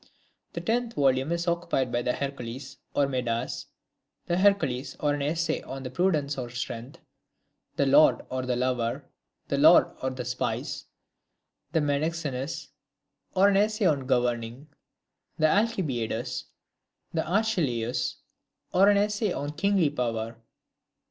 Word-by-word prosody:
The - - -4
tenth 235 +1 -1
volume 135 +1 +2
is 170 +1 -1
occupied 170 -7 0
by 120 - 0
the 125 0 0
Heracles, 135 -2 -5 0.2
or 145 - +4
Medas; 125 -2 -2 0.6
the 175 - 0
Hercules, 185 -10 +2
or 145 -1 +1
an 145 - -2
Essay 160 +2 0
on 135 0 -7
Prudence 150 -4 +1
or 120 -2 -4
Strength; 125 +1 -6 0.8
the 140 - +2
Lord 145 +3 +5
or 130 0 -1
the 125 - +1
Lover; 125 -2 -1 0.4
the - - 0
Lord - - +6
or 130 - 0
the 130 -1 -5
Spies; 125 +1 -3 0.9
the 160 -1 +2
Menexenus, 145 -1 -2 0.7
or 195 +2 +6
an 195 - +3
essay 210 +1 +2
on 140 -6 +2
Governing; 120 +2 -1 0.7
the 155 - +3
Alcibiades; 135 - 0 0.7
the 160 -1 0
Archelaus, 140 - 0 0.6
or 195 +3 +6
an 205 - +5
essay 210 0 +1
on 145 -2 -3
Kingly 180 -1 +2
Power. 115 -4 -2
140 Hz, 130 wpm, -27 LUFS, 125-170 Hz, 0.9 s, Lord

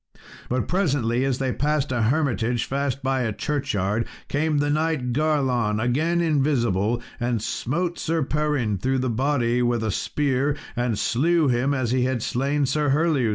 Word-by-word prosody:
But 125 -3 -1
presently 135 - +1
as 135 -2 0
they 130 -2 -1
passed 145 -1 0
a 120 -2 0
hermitage 120 -2 +1
fast 140 0 -2
by 135 0 +1
a 115 -3 0
churchyard, 110 -5 -1 0.2
came 150 +1 +1
the 145 0 +1
knight 155 -5 0
Garlon, 130 -7 +1
again 155 +9 +1
invisible, 120 - +1 0.2
and 120 -1 0
smote 170 - -2
Sir 165 -1 0
Perin 145 -8 0
through 130 +5 0
the 130 -1 0
body 125 -1 +1
with 120 -2 +1
a 110 - 0
spear, 140 +4 0 0.2
and 120 -3 0
slew 155 +7 +2
him 130 +3 +1
as 130 -3 -1
he 125 -1 +2
had 130 -3 -1
slain 140 +3 0
Sir 150 +2 0
Herleus. 145 -4 +2
130 Hz, 160 wpm, -24 LUFS, 120-150 Hz, 0.2 s, slew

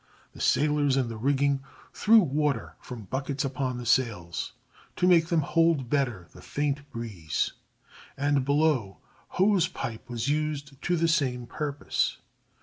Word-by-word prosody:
The - - -10
sailors 145 -2 +2
in 130 -3 +1
the 115 - -5
rigging 140 +3 +1 0.3
threw 225 +2 +5
water 145 - 0
from 120 -4 -8
buckets 135 +6 -2
upon 130 -2 -2
the 120 - -6
sails 105 -10 0 0.4
to - - +1
make 170 -3 +5
them 170 -3 +2
hold 160 -4 +2
better 125 - 0
the - - -13
faint 145 0 -2
breeze, 100 - -3 0.7
and 140 -1 +2
below 140 -8 +1 0.4
hose 190 -2 +4
pipe 115 0 -6
was 120 0 -3
used 145 -2 -2
to 175 - +1
the 165 +1 +2
same 130 -7 +1
purpose. 145 +2 -2
140 Hz, 145 wpm, -27 LUFS, 120-150 Hz, 0.7 s, threw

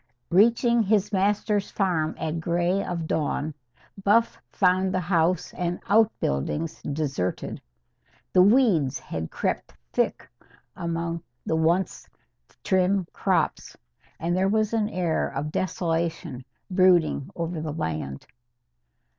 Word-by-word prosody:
Reaching 235 +5 +4
his 210 0 +1
master's 205 +1 +1
farm 170 -6 0
at 160 +1 -2
grey 175 +3 0
of 170 -3 -3
dawn, 155 -1 -1 0.5
Buff 225 +4 +3
found 185 0 +2
the 185 - 0
house 175 0 +1
and 175 -1 -2
outbuildings 165 - +1
deserted. 140 -11 -3 0.7
The 180 - +6
weeds 185 - +4
had 80 -8 -5
crept - - -3 0.2
thick - - 0 0.5
among 170 0 -3 0.2
the 160 - 0
once 170 +4 0 0.5
trim 190 0 +2
crops, - - 0 0.4
and 170 +2 0
there 190 +1 +2
was 215 +1 +1
an 215 -2 +1
air 175 -5 0
of 145 +3 -4
desolation 165 -7 -2 0.3
brooding 180 -6 +3
over 165 -1 -3
the 155 -1 -3
land. 75 - -4
175 Hz, 115 wpm, -25 LUFS, 160-195 Hz, 0.7 s, The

